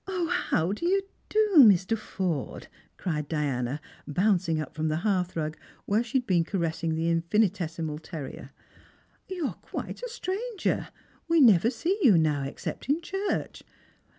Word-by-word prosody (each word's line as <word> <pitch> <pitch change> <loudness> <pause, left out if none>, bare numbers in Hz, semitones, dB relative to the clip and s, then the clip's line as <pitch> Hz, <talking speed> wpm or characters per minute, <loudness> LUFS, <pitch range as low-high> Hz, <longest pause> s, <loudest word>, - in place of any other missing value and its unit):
0, 365 -3 -1
how 175 - +1
do 275 +12 -2
yon 390 +1 +3 0.3
do, 425 -1 +2
Mr. 210 -3 +6
Forde 185 -8 -3
P" - - -16 0.3
cried 150 -5 -2
Diana, 140 -3 -1 0.3
bouncing 180 0 +1
up 155 - -5
from 155 0 -1
the 155 - 0
hearthrug, 180 -6 -1 0.3
where 210 +3 +2
she 240 +3 -1
had 250 - -1
been 180 -5 +3
caressing 165 -2 -1
the 160 +1 -1
infinitesi 170 -1 +1
mal 150 -1 -4
terrier. 155 -4 -8 0.4
" - - -36
You 360 -4 -3
are - - -2
quite - - -6
a - - -4
stranger. 445 -1 -2 0.4
We 335 0 +4
never 225 - +6
set 370 - -1
"^ou 205 -10 +7
now, 150 -3 +1
except 135 - -6
in 295 +3 +3
church. 390 +4 -3
185 Hz, 160 wpm, -27 LUFS, -, 0.4 s, ^ou